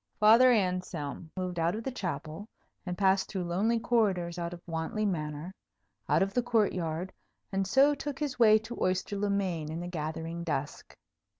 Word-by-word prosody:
Father 230 +4 +7
Anselm 180 - -1
moved 180 -2 -3
out 165 +4 +1
of 225 - -5
the 265 - -3
chapel, 170 - -5 0.4
and 180 0 -3
passed 190 -1 +2
through 190 -3 -3
lonely 200 +7 +1
corridors 190 -8 +1
out 170 0 -3
of 175 - -8
Wantley 170 +6 -2
Manor, 155 -2 -3 0.6
out - - +4
of 195 0 -3
the 245 - +2
court 230 -3 +2
yard, 170 +1 -3 0.4
and 195 -1 0
so 275 +7 +5
took 285 -1 -5
his 290 -5 -3
way 215 -2 +7
to 220 +2 -7
Oyster 185 +2 0
le 205 +1 -1
Main 180 -6 -1
in 160 - -4
the 175 - -5
gathering 165 0 -4
dusk. 145 -3 -4
185 Hz, 180 wpm, -30 LUFS, 170-215 Hz, 0.6 s, Father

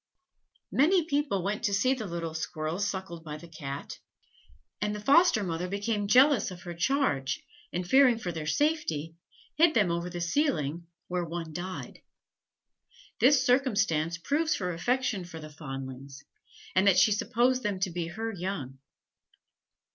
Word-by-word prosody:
Many 330 +5 +4
people 285 - 0
went 205 +2 -2
to 200 -3 +2
see 255 +6 +3
the 230 -6 -5
little 170 -2 -4
squirrels 160 +4 -2
suckled 190 -5 -5
by 150 -2 -6
the 170 +2 -12
Cat, 145 -4 -7 0.8
and 210 0 -1
the - - -5
foster 280 - +4
mother 175 -1 -2
became 205 +2 -2
jealous 255 +1 +5
of 180 -1 -10
her 175 - -6
charge, 165 - 0 0.3
and 180 0 -3
fearing 260 0 +5
for 180 -6 -4
their 160 -2 -5
safety, 165 - 0 0.4
hid 320 -1 +5
them 205 -6 +3
over 170 +1 -2
the 175 -1 -6
ceiling, 170 - 0 0.2
where 180 0 -1
one 165 -1 -5
died. 185 +3 -6 1.2
This 260 0 +5
circumstance 215 - +2
proves 310 - 0
her 180 -2 -2
affection 245 +2 0
for 170 -2 -9
the 155 -1 -10
fondlings, 135 -2 -8 0.5
and 190 +2 +3
that 190 -2 +5
she 195 +4 +6
supposed 245 +5 +1
them 205 -5 -2
to 190 - 0
be 170 -1 -3
her 225 +6 -4
young. 170 -9 -5
185 Hz, 155 wpm, -29 LUFS, 165-245 Hz, 1.2 s, she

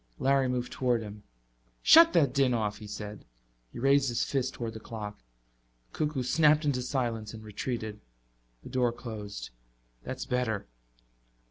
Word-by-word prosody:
Larry 135 0 +3
moved 125 0 -2
toward 125 -3 +1
him. 105 0 -9 0.6
"Shut 330 +1 +9
that 140 -6 +4
din 135 -3 +3
off," 105 -2 -1
he 105 - -9
said. 105 0 -7 0.5
He - - -10
raised 135 +1 +3
his 120 - 0
fist 135 -3 -1
toward 115 -2 -4
the 110 - -7
clock. 105 -2 -7 0.7
The - - -13
cuckoo 150 -4 0
snapped 150 +3 +4
into 135 -4 +1
silence 120 -4 -2
and 110 - -10
retreated. 110 0 -4 0.6
The - - -9
door 125 -2 +2
closed. 105 -4 -7 0.5
"That's - - -5
better." 120 -5 -1
120 Hz, 150 wpm, -29 LUFS, 110-135 Hz, 0.7 s, Shut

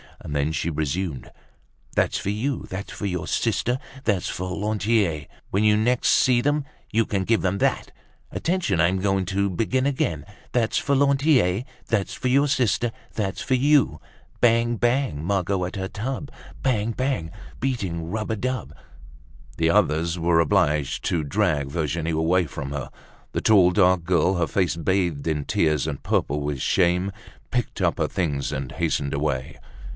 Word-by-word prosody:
And 75 - -6
then 70 +2 +1
she 80 +2 -1
resumed, 80 0 -3 0.6
"That's - - +2
for - - -3
you, 120 +7 -2
that's 95 +2 -6
for - - -6
your 90 -4 -3
sister. 125 +2 0 0.2
That's 100 -8 0
for 90 0 -4
Lantier. 105 -6 0 0.2
When 100 +3 +1
you 105 0 +5
next 120 +3 +2
see 125 -2 +4
them, 145 +2 +1 0.3
You 115 0 +2
can 95 -2 -1
give 115 +3 +2
them 95 +1 0
that. - - 0 0.4
Attention! 165 - 0
I'm 90 +3 +3
going 95 -1 +1
to 100 +2 0
begin 120 +8 0
again. 85 - -1 0.3
That's 115 -3 +1
for 140 - +1
Lantier, 135 - +3 0.2
that's 105 -4 0
for 130 - -2
your 140 +3 +4
sister. 120 -4 +1 0.2
That's 100 -3 -2
for 130 - +1
you. 135 - +3 0.4
Bang! 120 0 +3
Bang! 120 - 0
Margot 95 0 0
at 90 - -6
her 95 -1 -3
tub. 130 +8 -5 0.3
Bang! 115 -4 +1
Bang! 130 -11 -2 0.3
Beating 95 -11 -2
rub 110 +3 -3
a - - 0
dub—" 125 - -3 0.8
The 80 0 +2
others 85 -3 +2
were 85 0 +3
obliged 80 -6 +1
to 85 -3 0
drag 70 0 0
Virginie 80 +1 -2
away 85 +3 +2
from 70 -1 -6
her. 70 -3 -4 0.4
The - - -1
tall, 95 -5 +5
dark 90 -2 +3
girl, 90 +2 +2
her 85 -2 +1
face 90 -4 0
bathed 85 -3 0
in 75 -3 -1
tears 75 -3 +1
and 70 -3 -4
purple 75 +1 0
with 70 -2 -3
shame, 90 +2 +2 0.4
picked 125 -3 -2
up - - +2
her - - +2
things 75 -7 -2
and 65 -1 -4
hastened 70 -1 -1
away. 70 -1 -2
95 Hz, 165 wpm, -24 LUFS, 80-115 Hz, 0.8 s, you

